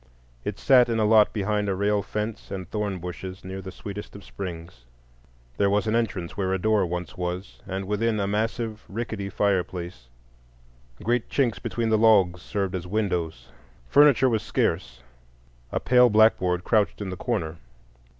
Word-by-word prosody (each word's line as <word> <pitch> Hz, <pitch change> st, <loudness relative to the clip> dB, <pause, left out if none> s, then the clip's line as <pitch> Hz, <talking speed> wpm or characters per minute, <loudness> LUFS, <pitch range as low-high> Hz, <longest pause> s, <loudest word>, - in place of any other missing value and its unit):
It -, -, -4 dB
sat 125 Hz, -3 st, +5 dB
in 115 Hz, -, 0 dB
a 110 Hz, -, +2 dB
lot 105 Hz, -1 st, +5 dB
behind 105 Hz, 0 st, -1 dB
a 95 Hz, -, 0 dB
rail 100 Hz, +1 st, +1 dB
fence 105 Hz, +2 st, -5 dB
and 95 Hz, -3 st, -5 dB
thorn 105 Hz, -1 st, -2 dB
bushes, 90 Hz, +2 st, -7 dB
near 95 Hz, +1 st, -6 dB
the 95 Hz, 0 st, -8 dB
sweetest 100 Hz, +3 st, -8 dB
of 100 Hz, -, -10 dB
springs. 85 Hz, -9 st, -8 dB, 0.7 s
There 100 Hz, -, +3 dB
was 105 Hz, +1 st, +1 dB
an 110 Hz, -, 0 dB
entrance 105 Hz, -7 st, -2 dB
where 95 Hz, -1 st, -1 dB
a -, -, +1 dB
door 105 Hz, -1 st, +2 dB
once 90 Hz, 0 st, -5 dB
was, 90 Hz, +2 st, -4 dB
and 95 Hz, 0 st, -3 dB
within, 105 Hz, +2 st, 0 dB
a 100 Hz, -, 0 dB
massive 110 Hz, +2 st, -2 dB
rickety 110 Hz, -2 st, -4 dB
fireplace; 90 Hz, -9 st, -2 dB, 1.0 s
great 120 Hz, 0 st, 0 dB
chinks 125 Hz, -6 st, +1 dB
between 115 Hz, -1 st, -2 dB
the 110 Hz, -1 st, +3 dB
logs 95 Hz, -6 st, +4 dB
served 100 Hz, -2 st, -2 dB
as 90 Hz, -1 st, -4 dB
windows. 90 Hz, -, -2 dB, 0.4 s
Furniture 140 Hz, -3 st, +6 dB
was 115 Hz, -4 st, +1 dB
scarce. -, -, -1 dB, 0.7 s
A -, -, 0 dB
pale 125 Hz, 0 st, +5 dB
blackboard 95 Hz, -5 st, +3 dB
crouched 105 Hz, -1 st, +1 dB
in 100 Hz, -3 st, -4 dB
the -, -, -4 dB
corner. 85 Hz, -7 st, -2 dB
100 Hz, 165 wpm, -25 LUFS, 90-110 Hz, 1.0 s, Furniture